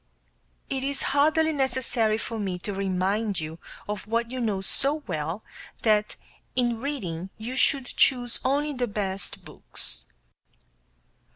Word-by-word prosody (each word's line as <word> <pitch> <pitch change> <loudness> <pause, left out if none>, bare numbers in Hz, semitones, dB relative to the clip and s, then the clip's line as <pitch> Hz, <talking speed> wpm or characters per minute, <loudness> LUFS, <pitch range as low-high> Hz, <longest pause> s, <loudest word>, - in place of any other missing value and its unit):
It 270 -1 -2
is 275 0 0
hardly 315 +2 +4
necessary 245 -5 +2
for 225 0 -4
me 190 -3 -1
to 200 +3 -4
remind 195 +1 0
you 160 +1 -5 0.3
of 210 0 -4
what 230 +1 0
you 255 - -3
know 210 -4 +1
so 285 +9 +2
well, 165 +4 -3 0.4
that 215 -2 +3 0.4
in 240 -2 +1
reading 190 - -3
you 235 +4 -5
should 265 0 +4
choose 245 -1 +3
only 290 +3 +1
the 250 -2 0
best 195 -2 -3
books. - - -3
230 Hz, 130 wpm, -27 LUFS, 195-265 Hz, 0.4 s, hardly